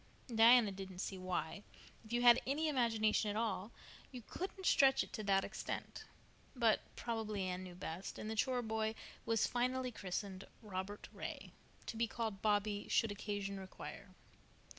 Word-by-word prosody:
Diana 225 -1 +7
didn't 190 -1 -7
see 190 +1 -3
why, 185 0 -2 0.4
if 220 - -14
you 240 +1 +1
had 240 -1 +8
an 275 +2 +1
imagination 230 -8 +2
at 205 - -2
all, 220 -2 -1 0.4
you 250 -3 -8
couldn't 380 - -5
stretch 270 -5 +5
it - - -12
to 215 - -4
that 195 -1 +4
extent; - - -5 0.5
but 230 -3 +4 0.2
probably 220 -4 -2
Anne 185 0 -2
knew 180 -1 -8
best, 180 0 -5
and - - -5
the 220 - -2
chore 250 +2 +1
boy 220 0 -1 0.3
was 225 -1 +3
finally 255 +1 0
christened 195 -2 -4 0.2
Robert 200 0 -5
Ray, - - -6 0.3
to - - -5
be 230 +1 +2
called 220 -3 -3
Bobby 205 -1 +1
should 225 - +3
occasion 200 -1 -3
require. 190 0 -8
215 Hz, 160 wpm, -37 LUFS, 195-235 Hz, 0.5 s, had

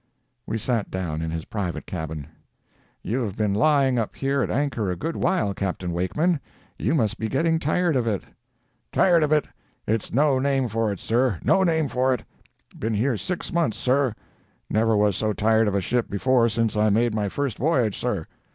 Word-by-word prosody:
We 110 - -1
sat 115 -1 -1
down 85 -4 -3
in 80 - -2
his 80 0 -4
private 95 -5 -4
cabin. 80 -4 -5 0.8
"You 120 +7 -1
have 105 -5 -3
been 105 -2 0
lying 135 +2 +3
up 110 - -3
here 135 0 0
at - - -1
anchor 130 -8 -1
a 90 - -1
good 160 - -4
while, 175 - +1
Capt. 95 -1 -3
Wakeman. 140 - 0 0.4
You - - +1
must 110 -6 0
be 110 - -2
getting 160 +5 +1
tired 165 +2 +1
of 120 -3 +1
it." 105 -4 -1 0.7
"Tired 175 -3 +4
of 150 -1 +1
it! 150 -1 +3 0.4
It's 110 0 -1
no 140 0 +3
name 135 -2 +1
for 110 0 0
it, 100 - -5
sir—no 120 - +2
name 160 -4 +2
for 130 0 +1
it. 120 - -9 0.6
Been 110 0 -1
here 120 +4 +1
six 180 - -4
months 165 -11 +1
sir. 130 -2 +1 0.6
Never 110 0 +3
was 105 -2 +3
so 110 +2 0
tired 110 +1 +3
of 100 - 0
a 100 - +1
ship 120 +5 0
before 120 +3 +2
since 115 -1 0
I 105 0 +3
made 115 +2 +2
my 105 -2 -1
first 140 0 -3
voyage, 125 -7 +2
sir. - - -2
115 Hz, 190 wpm, -24 LUFS, 105-140 Hz, 0.8 s, Tired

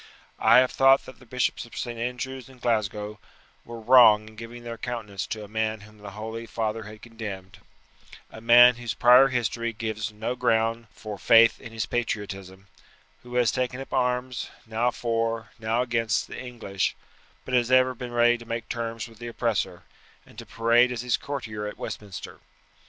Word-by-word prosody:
I - - +6
have 130 0 +5
thought 135 0 +5
that 130 - -12
the 130 - -18
Bishops 125 +2 -1
of 120 - -13
St. 120 -2 -4
Andrews 125 +1 -4
and 130 -1 -17
Glasgow 105 -3 -1 0.4
were 120 0 -9
wrong 110 -3 +6
in 110 - -17
giving 115 +2 -9
their 115 -1 -7
countenance 110 -5 -5
to 110 -1 -5
a - - -9
man 110 0 -2
whom 105 +1 -16
the 105 -1 -9
holy 110 +1 -6
father 110 0 -3
had 105 +1 -12
condemned 100 -4 -8 0.7
a 110 - -11
man 120 +1 +7
whose 120 -2 -4
prior 125 +2 +7
history 115 -2 -2
gives 110 -1 -4
no 110 +4 -4
ground 115 -1 +1
for 105 -3 -8
faith 115 +4 +5
in 115 - -10
his 110 -1 -3
patriotism, 100 -5 -4 0.6
who 125 0 -10
has 120 -2 +3
taken 125 0 -2
up 135 - -8
arms, 125 0 -1 0.2
now 115 +2 0
for, 115 -2 -2
now 115 +2 0
against, 115 -3 0
the - - -8
English, 115 -6 -3 0.5
but 130 - -6
has 120 -1 +2
ever 130 0 +4
been 125 0 -7
ready 120 0 +3
to 120 - -11
make 115 -1 -4
terms 115 -1 -4
with 115 -1 -17
the 120 - -7
oppressor, 115 -3 -2 0.4
and - - -14
to - - -10
parade 120 +2 +3
as 120 -1 -4
his 125 -1 +2
courtier 110 -7 -5
at 105 - -7
Westminster. 100 -3 -7
115 Hz, 180 wpm, -26 LUFS, 110-125 Hz, 0.7 s, man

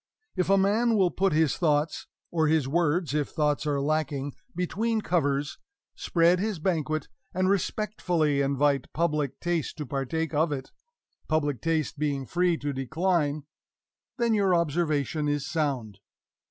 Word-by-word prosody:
if 180 0 0
a 195 - +5
man 220 +4 +3
will 185 -3 +3
put 195 0 +1
his 155 -1 +2
thoughts 155 -2 0 0.2
or 160 -2 +2
his 155 -3 +2
words, 165 +1 +1
if 150 -2 0
thoughts 150 -1 0
are 145 -1 +1
lacking 145 -1 -1 0.2
between 220 +6 0
covers 145 -8 0 0.3
spread 170 +1 +2
his 210 -1 -1
banquet, 155 -3 -1 0.3
and 185 +1 +2
respectfully 180 -7 0
invite 140 0 +1
Public 150 -4 -1
Taste 175 -4 -2
to 150 - -4
partake 140 +5 -2
of 155 +2 +2
it, 135 -2 -5 0.6
Public 145 -6 0
Taste 160 -2 -1
being 140 -3 -1
free 175 +3 +1
to 145 -2 -3
decline, 155 +2 0 0.7
then 235 -1 +2
your 195 -4 +3
observation 155 -2 0
is 145 -1 -1
sound. 130 -11 -2
155 Hz, 140 wpm, -27 LUFS, 145-175 Hz, 0.7 s, a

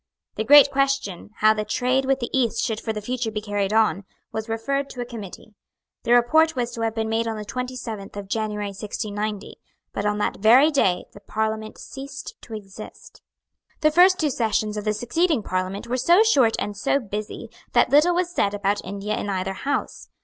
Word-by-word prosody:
The - - -2
great 285 +3 +8
question, 275 -10 -1
how 215 0 +6
the 215 -1 -2
trade 250 +5 0
with 270 0 +1
the 240 - -4
East 235 -3 +1
should 220 -1 -2
for 225 - -2
the 210 -1 -5
future 245 0 -2
be 215 -1 -3
carried 205 -2 -2
on, 215 -4 +2 0.3
was 220 +1 -5
referred 275 +5 -2
to 245 - -6
a - - -3
Committee. 220 -3 -10 0.5
The 235 - +3
report 315 +7 +4
was 245 -1 -2
to 230 - -6
have 225 -1 -1
been 220 -1 -1
made 225 +1 0
on 225 -1 -3
the 210 - -6
twenty 250 +3 -4
seventh 215 -5 -7
of 200 -1 -6
January 210 -1 -2
1690; 210 0 -5 0.3
but 200 - -3
on 210 0 0
that 210 - -1
very 250 +9 +6
day 185 -11 +1
the - - -12
Parliament 220 +1 -3
ceased 270 0 -8
to 225 - -8
exist. 205 0 -11 0.6
The 305 -1 +4
first 365 +3 +6
two 300 -3 +1
sessions 215 -3 0
of 210 0 -4
the 215 - +1
succeeding 280 - 0
Parliament 185 +3 -3
were 245 +2 -2
so 345 - +5
short 265 - +4
and 205 - -3
so 205 - +1
busy 215 0 -6 0.2
that - - +4
little 310 +5 +5
was 355 0 0
said 200 - +1
about 205 0 -1
India 200 +2 -4
in 205 - -4
either 190 0 -2
House. 280 +8 -3
220 Hz, 200 wpm, -23 LUFS, 210-260 Hz, 0.6 s, great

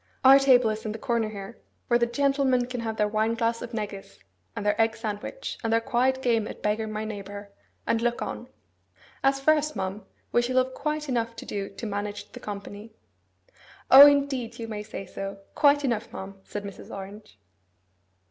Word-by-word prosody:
Our 270 +1 +9
table 250 -4 +5
is 215 0 -5
in 215 - -3
the - - -5
corner 230 -2 0
here, 205 +2 -9 0.3
where 240 0 +3
the 235 - +2
gentlemen 275 -1 +2
can 250 0 -5
have 220 -1 -4
their 210 - +2
wineglass 230 +2 0
of 240 - -6
negus, 210 -3 -6 0.4
and 205 - -4
their 210 +1 +2
egg 225 0 +2
sandwich, 220 - -5
and 225 - 0
their 230 - +4
quiet 255 +3 +1
game 230 -3 +2
at - - -9
beggar 215 +1 0
my 215 0 -4
neighbour, 200 -1 -7 0.3
and 225 - +1
look 240 0 0
on. 245 - -5 0.8
As 275 0 +3
for 310 +3 +5
us, 305 0 -1
ma'am, 190 +2 -4 0.3
we 240 - +4
shall 255 +2 -1
have 255 0 +2
quite 300 +2 -3
enough 230 -3 -1
to - - -8
do 200 -1 -4
to - - -6
manage 205 0 -4
the - - -9
company.' 205 +2 -8 1.0
'O, 275 +2 +12
indeed, 280 -5 +1
you 230 - -5
may 215 -2 -5
say 205 -2 -7
so! 195 +2 -6 0.2
Quite 290 -1 +4
enough, 235 -3 -1
ma'am,' 195 0 -8
said 205 - -6
Mrs. 200 -2 -9
Orange. 195 - -9
225 Hz, 190 wpm, -26 LUFS, 210-255 Hz, 1.0 s, O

